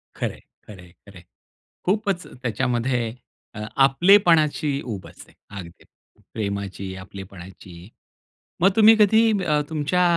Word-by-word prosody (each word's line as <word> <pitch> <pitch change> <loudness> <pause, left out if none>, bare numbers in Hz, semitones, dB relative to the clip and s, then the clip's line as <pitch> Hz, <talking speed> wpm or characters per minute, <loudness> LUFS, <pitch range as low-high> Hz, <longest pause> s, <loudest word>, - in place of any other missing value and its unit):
खरंय, - - -4 0.3
खरंय, 90 -4 -13 0.2
खरंय. 95 -3 -13 0.6
खूपच 195 -1 -1 0.2
त्याच्यामध्ये 120 0 -1 0.4
अ, - - -7 0.2
आपलेपणाची 155 0 +4
उब 105 -7 -6
असे - - -16 0.2
अगदी 85 -3 -10 0.5
प्रेमाची, 100 -2 -5
आपलेपणाची. 95 -1 -12 0.7
मग 190 - +6
तुम्ही 220 0 +7
कधी 220 +2 +5
अ, 150 -1 +2
तुमच्या 160 +3 0
125 Hz, 100 wpm, -23 LUFS, -, 0.7 s, तुम्ही